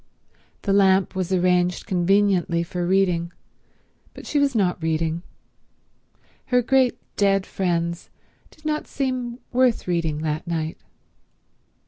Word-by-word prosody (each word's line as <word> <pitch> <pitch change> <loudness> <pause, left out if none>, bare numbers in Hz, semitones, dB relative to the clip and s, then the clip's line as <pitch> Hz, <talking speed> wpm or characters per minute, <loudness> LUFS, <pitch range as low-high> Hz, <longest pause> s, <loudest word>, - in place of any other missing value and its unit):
The 200 - +1
lamp 195 -1 +4
was 185 -1 -3
arranged 180 -1 +2
conveniently 185 -2 +2
for 175 0 -3
reading, 180 -3 +1 0.8
but - - -10
she 295 - 0
was 280 -3 +1
not 185 -5 +1
reading. 160 +1 -1 1.3
Her 250 -1 +3
great 260 0 +3 0.2
dead 195 -1 +2
friends 170 -2 -2 0.4
did 310 - -23
not 305 0 -1
seem 255 -3 -3
worth 250 -4 +2
reading 165 -3 -1
that 155 +2 -2
night. 160 -1 -3
185 Hz, 115 wpm, -23 LUFS, 170-225 Hz, 1.3 s, lamp